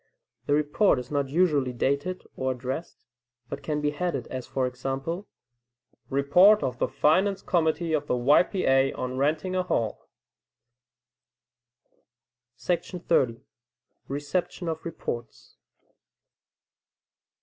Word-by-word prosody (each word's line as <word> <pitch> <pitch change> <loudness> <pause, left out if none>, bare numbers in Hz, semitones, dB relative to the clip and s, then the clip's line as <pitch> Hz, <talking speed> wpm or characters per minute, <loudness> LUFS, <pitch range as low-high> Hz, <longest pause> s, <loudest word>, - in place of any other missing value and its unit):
The 145 - +3
report 150 +4 +3
is 125 +2 -6
not 140 -2 0
usually 145 -5 +2
dated, 140 +9 -1
or 130 0 -1
addressed, 130 +6 -6 0.4
but - - -5
can 150 -1 -2
he 145 - +2
headed, 175 +4 -2
as 130 -2 -5
for 130 -1 -1
example, 135 +9 -4 0.8
"Report 175 +10 +5
of 125 -1 -2
the - - +2
Finance 190 +6 +2
Committee 165 -1 +1
of 150 -1 0
the - - +1
Y. 125 +4 +5
P. 185 +1 -2
A., 135 0 +3
on 130 0 -4
Renting 155 +6 0
a 185 - +2
Hall." 115 -12 -2 2.5
30. 170 -9 0 0.7
Reception 155 +6 -3
of 160 0 -4
Reports. 120 -8 -6
145 Hz, 115 wpm, -27 LUFS, 130-175 Hz, 2.5 s, Report